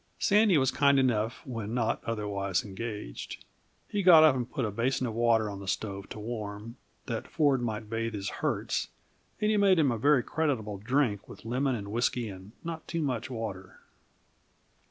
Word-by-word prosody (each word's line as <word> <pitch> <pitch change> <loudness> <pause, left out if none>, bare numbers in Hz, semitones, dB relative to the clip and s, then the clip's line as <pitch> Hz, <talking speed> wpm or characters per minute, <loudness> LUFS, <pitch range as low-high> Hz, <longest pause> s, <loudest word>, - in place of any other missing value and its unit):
Sandy 205 -3 +4
was 130 -2 +3
kind 140 -1 +4
enough 115 -4 +1
when 115 -3 -4
not 115 -3 0
otherwise 100 -4 -1
engaged. 105 - -6 0.4
He 205 - -1
got 175 -4 +8
up 155 -4 +6
and 125 -1 -3
put 130 - -2
a 105 - -2
basin 125 +5 0
of 115 - -3
water 115 -1 +3
on 100 -1 -6
the 100 - -9
stove 100 0 -3
to - - -7
warm, 105 +1 -6 0.3
that 115 -2 -4
Ford 145 -5 +2
might 110 -2 -3
bathe 115 0 -2
his 100 -1 -4
hurts, - - -1 0.5
and 210 0 +2
he 215 - +2
made 195 -2 +5
him 145 -5 +4
a 115 - -2
very 140 0 +4
creditable 120 - -1
drink 115 -2 0
with - - -12
lemon 130 +3 0
and 100 -3 -6
whisky 120 0 0
and 95 +1 -10
not 165 -1 -6
too 165 -2 -2
much 125 -5 -2
water. 100 -6 -6
115 Hz, 180 wpm, -29 LUFS, 105-135 Hz, 0.5 s, got